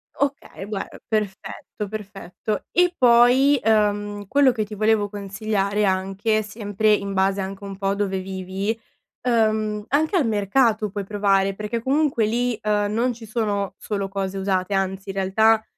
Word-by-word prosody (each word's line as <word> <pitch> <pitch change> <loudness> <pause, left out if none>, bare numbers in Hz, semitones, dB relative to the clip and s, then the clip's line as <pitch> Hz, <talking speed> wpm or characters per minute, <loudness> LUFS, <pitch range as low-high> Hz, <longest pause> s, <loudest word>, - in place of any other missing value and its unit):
Okay, 280 -8 -3
guar 205 -1 -4 0.2
perfetto, 205 -1 -4
perfetto. 205 -1 -5
E 355 0 +3
poi, 250 +3 +5
uhm, 205 -2 +1
quello 280 +1 +4
che 220 -3 -1
ti 210 +1 -8
volevo 215 -1 +2
consigliare 205 0 -1
anche, 195 +3 0
sempre 210 0 0
in 200 -1 -1
base 195 +1 +1
anche 195 +1 -6
un 195 -1 -6
po' 195 - -2
a 195 - +1
dove 195 -2 -1
vivi, 190 +3 -3 0.4
uhm, 215 -3 +1
anche 310 +6 +1
al 300 -10 +3
mercato 215 +1 +2
puoi 205 -1 -4
provare, 195 -1 +1
perché 210 +3 -3
comunque 270 -3 +1
lì, 240 +1 0
uhm, 210 -1 0
non 240 +3 +1
ci 225 0 -11
sono 210 -3 -1
solo 200 -2 -3
cose 195 0 -3
usate, 190 0 0
anzi, 190 0 -2
in 195 - -5
realtà, 220 +3 +3
210 Hz, 155 wpm, -23 LUFS, 195-225 Hz, 0.4 s, poi